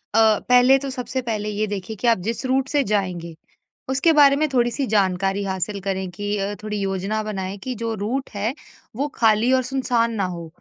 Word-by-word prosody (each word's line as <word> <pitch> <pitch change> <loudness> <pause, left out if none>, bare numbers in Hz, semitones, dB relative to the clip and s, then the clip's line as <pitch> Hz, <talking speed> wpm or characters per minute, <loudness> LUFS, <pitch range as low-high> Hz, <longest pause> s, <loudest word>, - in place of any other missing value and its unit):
अ, 220 -1 +5
पहले 250 +2 +6
तो 275 0 -5
सबसे 260 0 -3
पहले 215 -2 -2
ये 210 +1 -1
देखिए 205 +1 -5
कि 245 - 0
आप 230 - +5
जिस 230 +3 -2
रूट 260 +1 +1
से 285 0 +1
जाएँगे, 185 -6 -2 0.5
उसके 270 +5 +3
बारे 285 -2 +6
में 310 +2 +1
थोड़ी 240 -1 +2
सी 275 +3 -2
जानकारी 195 -1 +1
हासिल 190 +1 -2
करें 190 -1 -2
कि 205 +3 -3
अ, 200 +1 -2
थोड़ी 210 0 -3
योजना 195 +2 -1
बनाएँ 195 -2 -4
कि 255 - -3
जो 230 0 -3
रूट 235 +7 -3
है 210 +5 -1 0.4
वो 280 +5 -1
खाली 225 +2 +3
और 260 - +4
सुनसान 245 -2 0
ना 200 -3 0
हो। 170 -1 -7
215 Hz, 205 wpm, -22 LUFS, 195-255 Hz, 0.5 s, पहले